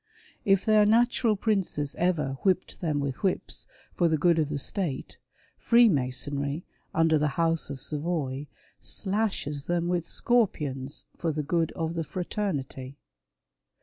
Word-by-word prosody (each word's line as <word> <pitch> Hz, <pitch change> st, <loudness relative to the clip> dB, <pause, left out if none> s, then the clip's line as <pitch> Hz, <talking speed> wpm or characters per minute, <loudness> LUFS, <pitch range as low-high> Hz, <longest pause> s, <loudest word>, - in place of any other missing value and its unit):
If 195 Hz, -1 st, +3 dB
their 215 Hz, -1 st, +5 dB
natural 235 Hz, 0 st, +3 dB
princes 190 Hz, -9 st, -1 dB
ever 155 Hz, -7 st, 0 dB
•' -, -, -25 dB
whipped 185 Hz, -2 st, 0 dB
them 155 Hz, -4 st, 0 dB
with 140 Hz, -2 st, -2 dB
whips/' 190 Hz, -2 st, -2 dB, 0.3 s
for 175 Hz, -, +2 dB
the 160 Hz, -1 st, +2 dB
good 170 Hz, +1 st, +3 dB
of 150 Hz, -2 st, +1 dB
the 145 Hz, -, -2 dB
state, 150 Hz, -1 st, -2 dB, 0.4 s
Freemasonry, 145 Hz, -, +2 dB, 0.3 s
under 160 Hz, -1 st, +3 dB
the 150 Hz, -2 st, -1 dB
House 165 Hz, -1 st, +1 dB
of 135 Hz, -, -5 dB
Savoy, 150 Hz, -2 st, -2 dB, 0.3 s
slashes 190 Hz, -9 st, -1 dB
them 175 Hz, 0 st, 0 dB
with 175 Hz, -2 st, 0 dB
scorpions, 150 Hz, -, 0 dB
for 165 Hz, -, -1 dB
the 150 Hz, 0 st, -2 dB
good 165 Hz, +2 st, 0 dB
of 165 Hz, 0 st, -2 dB
the 165 Hz, -1 st, -2 dB
fraternity. 145 Hz, -6 st, -4 dB
165 Hz, 140 wpm, -27 LUFS, 145-190 Hz, 0.4 s, their